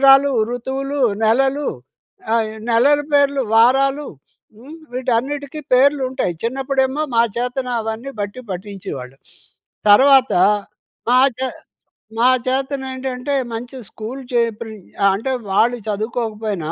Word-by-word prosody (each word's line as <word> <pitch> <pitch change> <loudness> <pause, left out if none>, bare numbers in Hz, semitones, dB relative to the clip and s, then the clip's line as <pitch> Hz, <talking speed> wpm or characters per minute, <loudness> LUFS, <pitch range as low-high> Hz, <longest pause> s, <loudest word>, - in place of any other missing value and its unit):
సంవత్సరాలు, 275 +1 +6 0.2
ఋతువులు, 270 +3 -3 0.2
నెలలు 270 +5 +2 0.7
ఆహ్, 225 -1 +2
ఈ - - -8 0.2
నెలల 280 +6 +4
పేర్లు, 280 -1 +3
వారాలు 270 +5 +4 0.5
హ్మ్. 290 +7 -11 0.2
వీటన్నిటికీ 265 +4 -2
పేర్లుంటాయి 260 -5 +2
చిన్నప్పుడేమో 265 +3 0
మా 230 - +6
చేతన 250 +1 -2
అవన్నీ 225 +5 -5
బట్టి 205 +5 -4
పట్టించేవాళ్ళు. 180 -9 -7 0.7
తర్వాత, 265 +3 +6 0.8
మా 250 - +5 0.2
చే 260 - 0 0.7
మా 245 +2 +5 0.2
చేతనేంటంటే 265 0 -3 0.2
మంచి 245 +3 -6
స్కూల్ 230 +5 -7
చేర్పించి 225 -3 -2 0.2
అంటే 260 +6 -2 0.2
వాళ్ళు 240 +5 +2
చదువుకోకపోయినా, 215 -5 -3
255 Hz, 100 wpm, -19 LUFS, 225-270 Hz, 0.8 s, సంవత్సరాలు